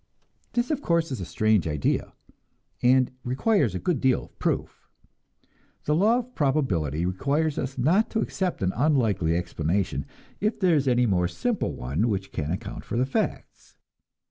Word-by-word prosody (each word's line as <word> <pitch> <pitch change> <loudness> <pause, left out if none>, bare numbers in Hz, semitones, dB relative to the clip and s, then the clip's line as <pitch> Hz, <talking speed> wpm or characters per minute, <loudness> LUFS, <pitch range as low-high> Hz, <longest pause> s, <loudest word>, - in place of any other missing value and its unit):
This, 240 +4 0
of 290 -2 -1
course, 170 - +1
is 125 -7 -3
a - - -4
strange 110 -2 +2
idea, 75 -2 -1 0.7
and 130 +1 +4
requires 130 - +1
a - - -1
good 165 - -1
deal 130 -1 +2
of - - -18
proof. - - -2 0.9
The 150 - +1
law 210 +9 +4
of 250 0 -5
probability 95 - 0
requires 140 - 0
us 135 0 -4
not 170 - +3
to 225 - -1
accept 185 - -2
an 95 - +1
unlikely 115 - +2
explanation, 90 +2 -1 0.3
if 215 +2 -1
there 185 -4 +3
is 140 -2 +1
any 125 -1 +3
more 90 -5 +2
simple 240 - -2
one 70 - -1
which 95 -2 -2
can 75 -1 -3
account 100 +5 -4
for - - -4
the 125 - +2
facts. 135 - -4
125 Hz, 165 wpm, -26 LUFS, -, 0.9 s, and